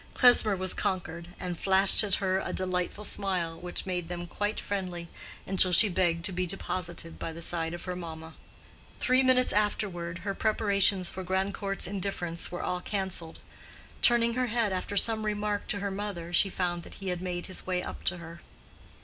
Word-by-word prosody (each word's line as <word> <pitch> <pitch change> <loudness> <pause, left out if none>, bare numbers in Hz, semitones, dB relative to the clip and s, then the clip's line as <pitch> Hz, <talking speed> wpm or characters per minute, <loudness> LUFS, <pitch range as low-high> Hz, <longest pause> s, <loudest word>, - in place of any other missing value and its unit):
Klesmer 245 -5 +7
was 185 0 +2
conquered, 170 -2 -3
and 180 -2 -5
flashed 195 +2 +6
at 200 -3 +1
her 190 -1 0
a - - -4
delightful 185 +2 -2
smile 180 -5 -1
which 175 0 -5
made 180 -3 -3
them 175 0 -5
quite 205 +4 -3
friendly 180 -4 -4 0.4
until 190 -1 +3
she 210 +4 +7
begged 170 -2 0
to - - +1
be 180 0 -2
deposited 175 -2 -3
by 165 - -4
the 165 - -9
side 165 0 -1
of 175 - -9
her 180 -1 -4
mamma. 160 -2 -8 0.7
Three 255 +1 +3
minutes 255 -1 +3
afterward 185 -5 -1
her 200 - -1
preparations 200 -3 +2
for 190 - -6
Grandcourt's 195 +1 -1
indifference 180 -4 -3
were 175 - -5
all 180 0 -2
canceled. 190 -5 -3 0.6
Turning 235 -1 +4
her 255 +1 0
head 230 -3 0
after 185 +2 -3
some 220 +1 +3
remark 210 -1 -2
to 200 - -1
her 200 0 -2
mother, 190 -4 -5
she 195 +3 +4
found 175 -2 -2
that - - -12
he 195 -1 -5
had 180 -1 -3
made 180 -1 -4
his 185 - -7
way 180 -1 -1
up - - -7
to 180 - +2
her. 170 -1 -11
185 Hz, 185 wpm, -28 LUFS, 175-200 Hz, 0.7 s, Klesmer